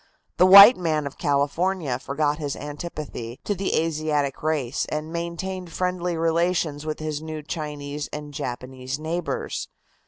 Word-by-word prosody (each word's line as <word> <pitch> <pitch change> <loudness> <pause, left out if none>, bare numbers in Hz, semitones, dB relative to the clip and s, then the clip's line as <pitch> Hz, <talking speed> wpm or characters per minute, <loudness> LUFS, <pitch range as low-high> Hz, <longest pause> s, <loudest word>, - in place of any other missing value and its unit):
The 185 - +6
white 200 +5 +11
man 155 -4 0
of 140 - -7
California 145 0 0
forgot 145 +2 -1
his 145 -3 -3
antipathy 145 -5 -6
to 205 - 0
the 195 0 -1
Asiatic 155 -3 -1
race, 150 -5 -1
and 155 +2 -4
maintained 170 +1 -4
friendly 180 -1 -1
relations 165 -2 0
with 155 - -2
his 155 -1 -4
new 155 -1 -6
Chinese 150 -1 -5
and 150 -1 -7
Japanese 130 +1 -5
neighbors. 160 +3 -3
155 Hz, 135 wpm, -24 LUFS, 145-170 Hz, -, white